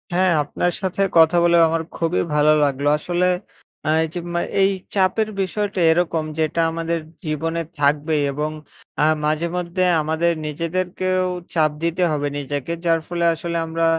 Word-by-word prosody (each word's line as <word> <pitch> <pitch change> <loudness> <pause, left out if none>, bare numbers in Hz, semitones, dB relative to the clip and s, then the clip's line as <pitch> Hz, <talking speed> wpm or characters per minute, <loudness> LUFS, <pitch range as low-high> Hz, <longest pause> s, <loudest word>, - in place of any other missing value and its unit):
হ্যাঁ, 185 0 +3
আপনার 175 +4 -1
সাথে 190 +1 -2 0.2
কথা 165 +2 +6
বলেও 170 -1 +5
আমার 165 0 0 0.2
খুবই 165 +1 0
ভালো 150 +1 +5
লাগলো। 140 0 0
আসলে 175 +3 -1 0.6
আ - - +2
এই 160 - -1
যে 175 - -3
মা 170 - +1 0.2
এই 195 - +5 0.3
চাপের 200 +3 +2
বিষয়টা 200 0 -2
এরকম 165 -1 +1 0.2
যেটা 160 +1 +1
আমাদের 165 0 -2 0.3
জীবনে 165 +2 -2 0.2
থাকবেই 150 +1 +2
এবং 150 +2 -2 0.5
আ - - +5 0.2
মাঝেমধ্যে 170 +4 -1 0.2
আমাদের 160 +3 +1 0.2
নিজেদেরকেও 185 +4 -1 0.3
চাপ 155 -3 +3
দিতে 170 +2 0
হবে 145 -1 -1
নিজেকে, 145 +2 -4
যার 165 -1 +3
ফলে 170 -1 -1
আসলে 170 +1 -4
আমরা 165 0 -1
165 Hz, 150 wpm, -21 LUFS, 155-180 Hz, 0.6 s, কথা